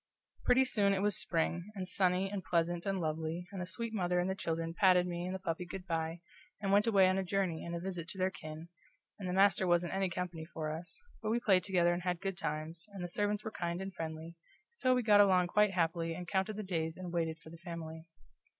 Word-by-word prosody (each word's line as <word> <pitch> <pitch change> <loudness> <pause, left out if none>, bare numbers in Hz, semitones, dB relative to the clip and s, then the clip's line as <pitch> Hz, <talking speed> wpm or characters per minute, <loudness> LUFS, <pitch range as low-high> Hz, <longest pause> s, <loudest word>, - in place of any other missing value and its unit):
Pretty 260 +1 +5
soon 200 -5 +3
it 190 - -1
was 205 -2 +2
spring, 170 +4 0
and 185 -2 -4
sunny 185 0 +2
and 195 -1 -4
pleasant 170 +2 0
and 195 -1 0
lovely, 160 +1 -2
and 195 -2 -5
the 180 - -4
sweet 230 +3 -4
mother 180 -3 +1
and 180 - +1
the 190 - 0
children 165 -3 -2
patted 180 -1 +5
me 175 0 -3
and 185 - -3
the - - -1
puppy 180 -2 -3
good 180 +1 -7
by, 165 -1 -2 0.4
and 200 -1 -1
went 205 +3 +5
away 195 -4 +6
on 185 +1 +2
a - - 0
journey 185 -3 -1
and 170 0 -4
a - - -2
visit 175 -2 -4
to 190 - -6
their 185 0 +1
kin, 155 0 -8 0.5
and 185 -2 -4
the - - -1
master 195 -1 +4
wasn't 175 0 +2
any 190 -1 +1
company 175 -2 -4
for 160 -1 -4
us, 165 - -6 0.2
but 215 - -2
we 230 +2 +2
played 190 -6 +4
together 175 -2 +3
and 175 - -2
had 180 -1 -1
good 195 +1 -3
times, 160 +2 -4
and 190 -3 -5
the - - -2
servants 205 +3 -1
were 220 - -4
kind 170 -3 -3
and 190 0 -5
friendly, 160 0 -6 0.4
so 255 - +2
we 250 - +1
got 205 -2 +7
along 185 -3 +5
quite 210 +4 +4
happily 165 -2 0
and 180 0 -7
counted 190 +3 0
the 215 - -4
days 165 -4 -2
and 180 -2 -6
waited 165 -2 0
for 160 +1 -14
the 170 - -10
family. 165 -1 -7
180 Hz, 240 wpm, -33 LUFS, 170-195 Hz, 0.5 s, got